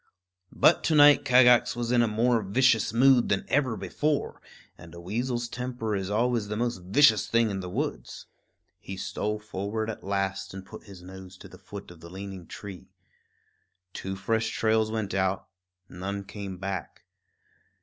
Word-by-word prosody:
But - - +4
to 160 - +2
night 145 0 +7
Kagax 125 -1 +5
was 120 0 -3
in 125 -1 +4
a 120 - +3
more 115 +2 +1
vicious 110 +2 +2
mood 125 +1 +4
than 100 - 0
ever 130 -5 +1
before; 150 -1 -2 0.3
and 85 0 -14
a - - -9
weasel's 120 +6 -3
temper 120 -3 -4
is 95 -1 -3
always 115 0 0
the 105 +1 -4
most 120 -1 -1
vicious 110 +2 +4
thing 115 -2 +2
in 95 - -3
the 90 -1 -6
woods. - - -4 0.5
He 95 - -8
stole 105 +2 -3
forward 105 +1 -4
at - - -11
last 95 -1 -3
and 95 -1 -8
put 110 - -12
his 95 -3 -13
nose 95 0 -11
to - - -12
the - - -15
foot 100 -2 -10
of 85 - -15
the 85 +1 -12
leaning 95 -1 -8
tree. 100 -3 -10 1.0
Two 95 0 -5
fresh 110 +3 -1
trails 110 -1 +1
went 110 -3 -3
out; 95 0 -1 0.4
none 100 +3 -5
came 100 -2 -7
back. 95 -2 -6
105 Hz, 170 wpm, -27 LUFS, 95-120 Hz, 1.0 s, night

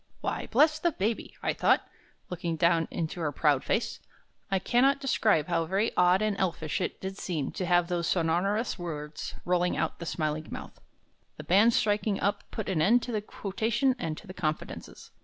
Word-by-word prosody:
'" - - -36
"Why, - - -3
bless 305 +6 +4
the 345 +2 +2
baby!" 220 +1 -2
I - - +1
thought, - - +2 0.4
looking 170 -2 -2
down 165 0 +3
into 170 +1 -4
her 155 -3 -1
proud 145 -1 +2
face. - - -1 0.5
I 195 - +2
cannot 260 +8 +3
describe 215 - +2
how 165 -1 0
very 195 +6 0
odd 180 +3 +4
and 215 -1 +1
elfish 165 -3 -1
it - - -3
did 190 0 -6
seem 155 -7 -2
to 185 - -4
have 175 -1 +3
those 170 -2 -1
sonorous 185 +7 0
words 150 -3 -5
rolling 180 0 +1
out - - 0
of - - -29
the 170 - -6
smiling 155 -1 -2
mouth. - - -8 0.6
The - - -7
band 210 +6 +4
striking 205 -1 +1
up 200 - -1
put 220 - -5
an 180 -5 0
end 230 +8 +4
to 245 - -4
the 215 -2 -1
quotation 225 +6 -1
and 155 -8 -3
to - - -11
the 185 - -9
confidences. 155 -4 -5
180 Hz, 195 wpm, -28 LUFS, 165-215 Hz, 0.6 s, bless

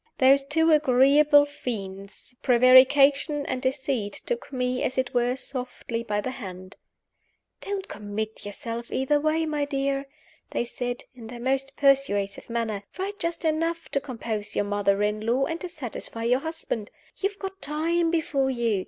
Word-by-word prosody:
Those 275 +1 +5
two 320 +4 +3
agreeable 290 +1 +5
fiends, 200 -6 -7
Prevarication 275 +4 +5
and 255 0 -3
Deceit, 260 -5 -1
took 485 0 -3
me, 250 -1 -1
as 255 - -1
it 260 -1 0
were, 245 0 +2
softly 250 -3 -5
by 210 -3 -1
the 255 - -3
hand: 185 -7 -9 0.9
"Don't 395 -1 -4
commit 210 +1 -5
yourself 230 +3 -6
either 280 +3 +2
way, 310 +2 +1
my 300 -2 -1
dear," 275 -1 -1 0.4
they - - -1
said, 245 +1 -4
in 235 -3 -11
their 240 +1 -8
most 270 +2 -1
persuasive 265 -10 +2
manner. 230 -3 -2 0.2
"Write 400 +2 -4
just 335 0 -3
enough 330 +1 0
to 280 - 0
compose 225 -6 -4
your 205 - +1
mother 205 0 +1
in 210 +1 -1
law 245 +4 +2
and 330 +2 -4
to 360 - -4
satisfy 245 -7 -6
your 245 +2 +3
husband. 320 -9 -4 0.3
You 395 - 0
have 405 - -17
got 385 -1 -7
time 330 +3 +1
before 295 -5 +1
you. 235 -5 0
260 Hz, 160 wpm, -26 LUFS, 230-295 Hz, 0.9 s, Those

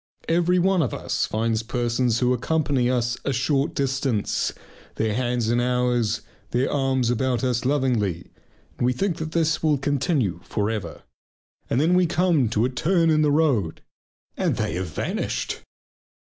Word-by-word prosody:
Every 175 +2 +2
one 185 0 +3
of 125 -8 -1
us - - -1
finds 110 0 0
persons 120 0 0
who 125 0 +3
accompany 135 -1 0
us 120 -1 0
a 140 - -1
short 135 +2 0
distance, 135 -5 0 0.4
their 110 -1 0
hands 120 -1 0
in 120 - +2
ours, 125 -2 +1 0.3
their 125 +3 0
arms 135 -3 +1
about 125 +1 0
us 125 -2 0
lovingly, 125 - 0 0.5
and - - +1
we 125 - +2
think 175 +5 -1
this 160 0 0
will 155 -2 +2
continue 135 - 0
for 105 +1 -1
ever, 90 -9 -5 0.7
and 120 - +1
then 160 +5 +3
we 180 -1 +4
come 165 -8 +2
to 110 +1 +1
a - - 0
turn 165 +4 +2
in 155 0 +3
the 150 - +3
road 140 - +1 0.5
and - - 0
they - - -2
have 90 +1 -3
vanished. 75 - -3
125 Hz, 160 wpm, -24 LUFS, 115-150 Hz, 0.7 s, we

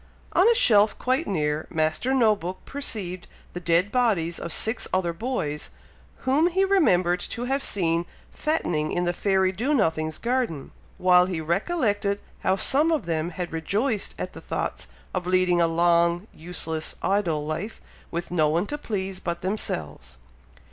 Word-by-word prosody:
On 390 +5 +5
a 470 - +4
shelf 210 - +5
quite 260 +6 0
near, 150 -4 -1
Master 160 +9 0
No 230 -5 +4
book 185 -1 -7
perceived 200 -10 -4 0.3
the 180 - -4
dead 175 +3 +2
bodies 200 -10 +1
of 170 - -5
six 220 +8 -1
other 180 -2 0
boys, 165 - -3 0.6
whom 280 +6 +4
he 380 +2 +2
remembered 185 - +3
to 245 0 -4
have 270 +2 0
seen 170 -7 -1 0.2
fattening 170 - -1
in 180 0 0
the 175 - +1
fairy 190 0 +2
Do 245 +10 0
nothing's 160 - 0
garden, 235 - -2 0.3
while 180 0 +5
he 180 -3 -3
recollected 205 - 0 0.2
how 190 - +2
some 290 - +4
of 310 - 0
them 165 0 -1
had 175 0 -5
rejoiced 205 - -1
at - - -5
the - - -10
thoughts - - -4 0.3
of 180 -1 -3
leading 180 -1 +3
a 165 - +4
long, 170 +2 +2
useless, 160 -1 -4
idle 175 -7 +1
life, 165 +8 -4 0.3
with 170 +1 -4
no 155 -4 +3
one 170 +5 +1
to 295 +6 -4
please 195 -6 -3
but 170 -1 -4
themselves. 80 - -3
185 Hz, 160 wpm, -25 LUFS, 170-230 Hz, 0.6 s, On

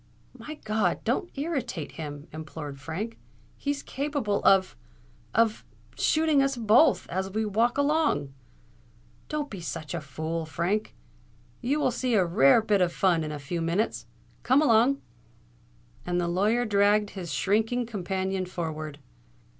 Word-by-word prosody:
"My 310 - -8
God! 215 0 0
don't 350 - 0
irritate 275 - -3
him!" 145 -2 -7
implored 150 -2 -7
Frank. 175 +11 -5 0.4
"He's 285 0 -3
capable 275 -8 -2
of——of——shooting 195 - 0
us 275 -1 +1
both—as 220 - +3
we 215 +3 -1
walk 230 +4 +1
along." 285 - +1 1.0
"Don't 300 -1 -3
be 195 -4 -6
such 155 +1 -5
a 170 - -3
fool, 160 +3 -4
Frank. 175 +8 -1 0.7
You 280 +5 0
will 255 - +2
see 245 0 0
a 190 -4 +4
rare 165 +3 +5
bit 205 -3 +2
of 175 -1 +3
fun 175 -3 +2
in 155 - -4
a 150 - -4
few 155 +5 -4
minutes. 175 +7 -1 0.3
Come 260 +3 +4
along!"—and 175 - -1
the 175 - 0
lawyer 210 +7 +2
dragged 205 0 +3
his 185 -4 -6
shrinking 225 +5 +1
companion 190 -3 -2
forward. 155 -4 -5
195 Hz, 130 wpm, -27 LUFS, 160-240 Hz, 1.0 s, rare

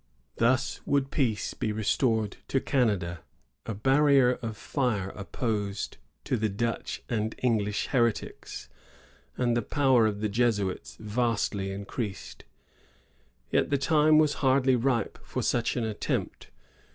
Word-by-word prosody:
Thus 130 +3 +1
would 140 -1 +1
peace 115 -8 0
be 110 - -2
restored 110 0 0
to 135 - +1
Canada, 100 - 0 0.5
a 115 - -3
barrier 135 +2 +4
of 110 -3 -5
fire 110 -10 -1
opposed 100 0 -3 0.3
to 125 - 0
the 110 0 0
Dutch 115 +4 -3
and 110 -2 -2
English 105 -4 0
heretics, 120 -4 -1 0.7
and 120 -2 +1
the 120 - +2
power 130 -2 +3
of 105 -1 -2
the 110 - +1
Jesuits 105 -3 -1
vastiy 105 -3 -1
increased. 100 +1 -6 1.1
Tet - - +2
the 140 - +2
time 155 +2 +4
was 155 -1 +4
hardly 130 -1 +4
ripe 120 -1 0
for - - -4
such 120 +1 0
an 120 - 0
attempt. 110 -2 -3
115 Hz, 125 wpm, -28 LUFS, 105-130 Hz, 1.1 s, barrier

